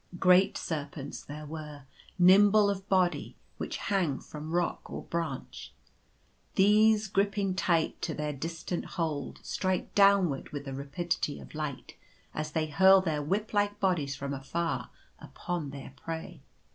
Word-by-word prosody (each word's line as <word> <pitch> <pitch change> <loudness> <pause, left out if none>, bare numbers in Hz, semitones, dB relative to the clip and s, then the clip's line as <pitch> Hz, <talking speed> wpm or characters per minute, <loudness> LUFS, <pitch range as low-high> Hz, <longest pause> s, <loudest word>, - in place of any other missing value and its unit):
Great 185 +1 +5
serpents 145 -3 -5
there 150 +1 -8
were, 150 -2 -8 0.3
nimble 200 +3 +6
of 195 0 -6
body, 185 -2 +1 0.2
which - - -3
hang 180 -9 0
from 150 +1 -8
rock 175 +1 -1
or - - -6
branch. 165 -6 -5 0.8
These 215 +2 +5
griping 195 -1 +1
tight 170 -3 +1
to - - -2
their 150 0 -2
distant 165 +4 -4
hold, 155 -5 -2
strike 185 -1 -2
downward 195 -8 +4
with 145 -1 -6
the 135 - -5
rapidity 145 +3 -2
of - - -12
light 150 -3 -5 0.4
as 155 0 -4
they 160 -1 +1
hurl 190 +5 +6
their 160 -5 -1
whip 200 +10 -2
like 205 0 +1
bodies 160 -8 +1
from 140 +1 -4
afar 135 -2 -3 0.3
upon 175 -5 -5
their 135 -1 -9
prey. 165 +3 -7
170 Hz, 140 wpm, -30 LUFS, 145-190 Hz, 0.8 s, nimble